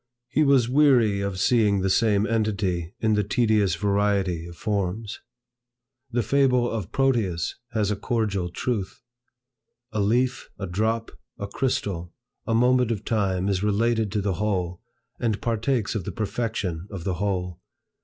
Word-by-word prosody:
He 150 - +1
was 135 -5 +4
weary 125 -7 +4
of 100 -2 -3
seeing 105 -3 +3
the 95 - +1
same 105 -1 +3
entity 100 -6 -1
in 110 -1 +2
the 105 0 +2
tedious 105 -2 +2
variety 100 -4 0
of 85 - -10
forms. 105 0 -2 0.9
The 120 -1 0
fable 125 0 +3
of 110 -7 -4
Proteus 115 -11 +1 0.2
has 105 -2 +1
a - - +1
cordial 100 -5 -1
truth. 105 0 -3 0.9
A 105 - -2
leaf, 120 +5 +1
a - - -4
drop, 110 +5 -1 0.3
a 100 - -4
crystal, 100 -7 -2 0.3
a 115 - +1
moment 125 0 +3
of 110 -3 -3
time 95 -4 0
is 95 -2 0
related 110 +1 +1
to 105 - +1
the 100 -1 0
whole, 90 -4 -1 0.4
and 110 -3 0
partakes 115 0 0
of 110 -5 -2
the - - -4
perfection 105 -5 -3
of 95 -4 -7
the 95 - -1
whole. 90 -3 -2
105 Hz, 150 wpm, -25 LUFS, 95-115 Hz, 0.9 s, was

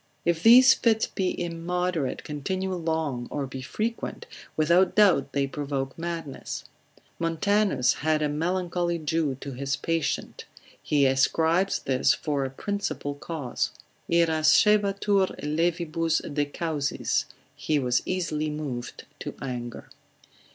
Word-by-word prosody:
If 170 -1 +1
these 250 +5 +8
fits 220 -2 +2
be 185 -2 -2
immoderate, 175 -3 -2
continue 185 +6 -3
long, 160 -7 -2
or 145 - -3
be 130 0 -7
frequent, 225 - -4 0.3
without 170 +5 +3
doubt 190 -10 +4
they 140 -1 +1
provoke 135 -1 -3
madness. 165 -4 -5 0.6
Montanus, 165 - +2
consil. - - -11
21, 155 +2 +1
had 155 0 +2
a 150 - +1
melancholy 175 +1 -1
Jew 155 -3 -1
to 140 - -6
his 135 +1 -2
patient, 165 0 -2 0.4
he 145 -2 +2
ascribes 160 +8 +2
this 130 0 +2
for 145 -4 -2
a 135 - -2
principal 200 -1 -3
cause: 145 -3 -3 0.4
Irascebatur 195 +5 +3
levibus 165 +1 0 0.2
de 145 0 +1
causis, 145 -2 -1 0.3
he 155 - 0
was 125 -3 +1
easily 155 -4 -1
moved 140 -5 -5
to - - -6
anger. 120 -3 -6
160 Hz, 125 wpm, -26 LUFS, 140-180 Hz, 0.6 s, these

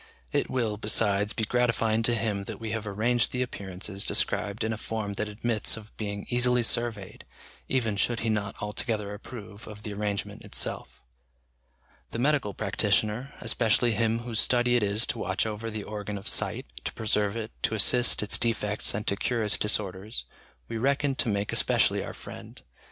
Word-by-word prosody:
It - - +1
will, 115 -5 0
besides, 105 -1 +2
be 115 - -2
gratifying 115 -1 +2
to 120 +1 +3
him 105 -3 -1
that - - -6
we 110 -1 -4
have 115 -1 -3
arranged 115 +4 +1
the 125 0 0
appearances 100 -3 -3
described 100 +1 0
in 110 0 0
a - - -4
form 110 -2 -3
that 105 +1 -2
admits 110 +1 0
of 110 -1 -12
being 100 -1 -4
easily 125 0 +3
surveyed, 115 -4 -1 0.5
even 115 -6 +1
should 115 +3 +1
he 115 - 0
not 100 -2 -1
altogether 105 0 -2
approve 105 -1 -9
of 105 -1 -10
the 105 - -5
arrangement 100 -1 -3
itself. - - -1 1.1
The - - -5
medical 130 -6 +1
practitioner, 110 +5 0
especially 115 +1 +2
him 115 +1 +1
whose 120 -2 -1
study 120 0 +3
it 120 - +4
is 105 +3 +1
to 120 - -3
watch 95 +1 0
over 110 +1 -3
the 110 -2 -4
organ 105 -1 -5
of 100 - -8
sight, - - +2 0.2
to - - -3
preserve 105 -1 +1
it, 110 -1 -4
to 110 - +1
assist 120 +3 +4
its 105 - +2
defects 105 -4 0
and 105 - -3
to 100 - +1
cure 115 +3 0
its 105 - +2
disorders, 105 +1 0 0.4
we 115 - -4
reckon 140 +2 +2
to 120 - +1
make 100 -1 -1
especially - - +3
our - - -7
friend. - - -10
110 Hz, 180 wpm, -28 LUFS, 105-115 Hz, 1.1 s, it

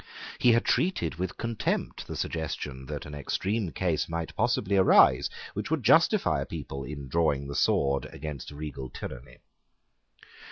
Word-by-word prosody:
He 120 - +6
had 115 - +2
treated 180 - +1
with 95 0 -3
contempt 115 -2 -2
the - - -5
suggestion 70 -4 -4
that - - -5
an 75 - -9
extreme 95 - -2
case 85 -4 -1
might 85 0 -4
possibly 100 +2 +1
arise 95 -1 +6 0.2
which - - -4
would - - 0
justify - - +4
a - - -2
people 70 0 -6
in 70 +1 -7
drawing 70 -2 +1
the 70 - -5
sword 70 -1 +2
against 75 -2 -6
regal 75 -3 -6
tyranny. 60 +1 -8
75 Hz, 150 wpm, -28 LUFS, 70-95 Hz, 0.2 s, He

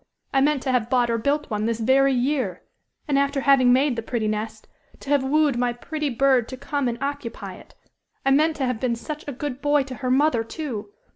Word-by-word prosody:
I 270 - +3
meant 290 -1 +2
to 265 - 0
have 245 -2 0
bought 245 -2 +2
or 230 - 0
built 285 +3 -1
one 210 +1 -1
this 230 -1 -1
very 270 +4 +4
year. 265 +2 -1 0.4
And 280 -2 +2
after 280 0 0
having 265 -3 +5
made 265 +1 +3
the 230 - -3
pretty 225 -1 -2
nest, 215 +1 -4 0.3
to 280 - -6
have 285 -2 +3
wooed 285 -2 +2
my 245 -1 +1
pretty 300 +4 -4
bird 260 -1 +2
to 260 - -7
come 280 0 -2
and 235 -1 -2
occupy 280 -5 -5
it. - - -17 0.5
I 270 - +3
meant 310 +3 +3
to 275 - -1
have 250 -3 -2
been 245 -1 0
such 295 +6 -7
a - - -3
good 275 0 -5
boy 290 -1 +3
to 265 -1 -8
her 255 - -1
mother, 265 -2 +3
too! 225 -5 -6
265 Hz, 225 wpm, -23 LUFS, 240-285 Hz, 0.5 s, having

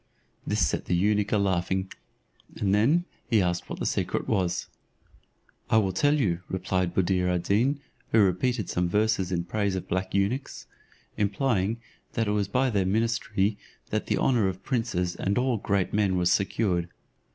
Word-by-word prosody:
This 105 -6 +2
set - - -2
the 90 - 0
eunuch 105 +3 +1
a 105 - +3
laughing, 95 -1 0 0.6
and 100 -1 0
then 140 +12 +3 0.2
he 115 - +4
asked 90 -1 -1
what - - -5
that - - -3
secret - - -1
was. 90 -5 0 1.0
"I 110 - +4
will 100 -3 +2
tell 145 +10 +3
you," 95 - +1
replied 95 -1 -1
Buddir 90 -1 +2
ad 90 -1 0
Deen, 120 +10 +2 0.3
who - - +3
repeated 105 +5 +1
some 90 0 0
verses 105 -2 +1
in 85 -1 0
praise 100 +2 -1
of 95 - -4
black 95 +2 -2
eunuchs, 105 +8 -1 0.5
implying, 105 0 +1 0.4
that 115 -2 0
it - - +1
was 105 -2 0
by 125 +5 +1
their 100 -3 +1
ministry 110 -1 0 0.3
that - - -1
the - - +1
honour 120 -7 +2
of 95 0 -4
princes 105 -8 -1
and 100 +1 -1
of 125 - +2
all 130 -3 +1
great 100 -2 -1
men 100 -3 +2
was 90 0 +2
secured. 95 -3 +1
100 Hz, 175 wpm, -27 LUFS, 90-110 Hz, 1.0 s, he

